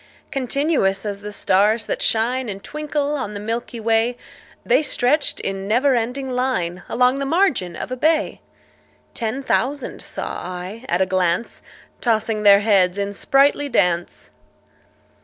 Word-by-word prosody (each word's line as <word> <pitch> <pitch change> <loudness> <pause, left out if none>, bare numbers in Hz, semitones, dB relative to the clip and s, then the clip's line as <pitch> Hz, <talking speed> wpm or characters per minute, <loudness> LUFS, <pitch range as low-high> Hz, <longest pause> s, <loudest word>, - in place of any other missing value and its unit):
Continuous 260 -7 0
as 200 -1 -4
the 210 0 -7
stars 210 +3 +2
that - - -3
shine 240 +2 +1
And 195 -1 -7
twinkle 295 -1 -2
on 210 -7 -4
the - - -4
milky 230 +2 -4
way, 225 +2 +1 0.5
The - - +4
stretched 285 0 +1
in 195 0 -3
never 255 +6 +3
ending 250 +3 -2
line 250 -9 -1
Along 250 +3 +2
the 275 - -2
margin 280 - +1
of - - -6
a - - -1
bay: 310 +5 +1 0.7
Ten 235 +4 -3
thousand 275 +1 -1
saw - - -5
I 185 +6 -7
at 175 +2 +1
a - - +4
glance, 185 +3 0 0.4
Tossing 220 -2 0
their 200 -1 +7
heads 195 -3 +3
in 200 0 -2
sprightly 280 +6 +2
dance. 175 -7 0
225 Hz, 145 wpm, -21 LUFS, 200-265 Hz, 0.7 s, their